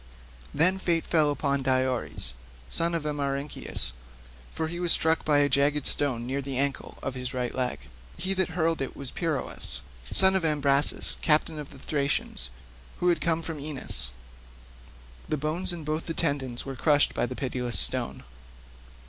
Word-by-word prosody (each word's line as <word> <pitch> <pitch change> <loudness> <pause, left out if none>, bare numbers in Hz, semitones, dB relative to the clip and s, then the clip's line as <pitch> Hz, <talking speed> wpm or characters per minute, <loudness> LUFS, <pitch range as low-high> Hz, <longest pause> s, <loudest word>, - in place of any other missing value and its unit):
Then 185 +5 +4
fate 170 -3 0
fell 155 -3 +3
upon 140 -1 0
Diores, 130 - 0 0.4
son 170 0 0
of 165 - -2
Amarynceus, 140 - 0 0.6
for 160 - -2
he 170 +2 -5
was 175 -1 +3
struck 160 0 +3
by 150 -2 +3
a 145 0 +5
jagged 140 +1 +2
stone 130 -5 +2
near 135 +3 -2
the 135 -1 -4
ancle 140 0 -2
of 135 - -2
his 125 0 -5
right 125 -1 -2
leg. 125 -1 -2 0.4
He 190 +2 -1
that 190 -2 +1
hurled 165 -2 +1
it 135 - -4
was 135 -2 -6
Peirous, 155 - -2 0.2
son 190 - +5
of 190 - +1
Imbrasus, 145 -2 +3
captain 155 0 +3
of 150 - -7
the 140 - -13
Thracians, 140 - -1 0.5
who 180 - +3
had 170 -3 +2
come 165 0 +1
from 160 -2 -5
Aenus; 140 - -2 1.2
the 155 - 0
bones 155 +6 0
and 170 -3 -5
both 155 +2 -2
the 165 - -3
tendons 130 -4 -1
were 135 -1 -5
crushed 145 +3 +3
by - - 0
the 130 - -6
pitiless 125 -2 -2
stone. - - 0
145 Hz, 165 wpm, -27 LUFS, 135-160 Hz, 1.2 s, a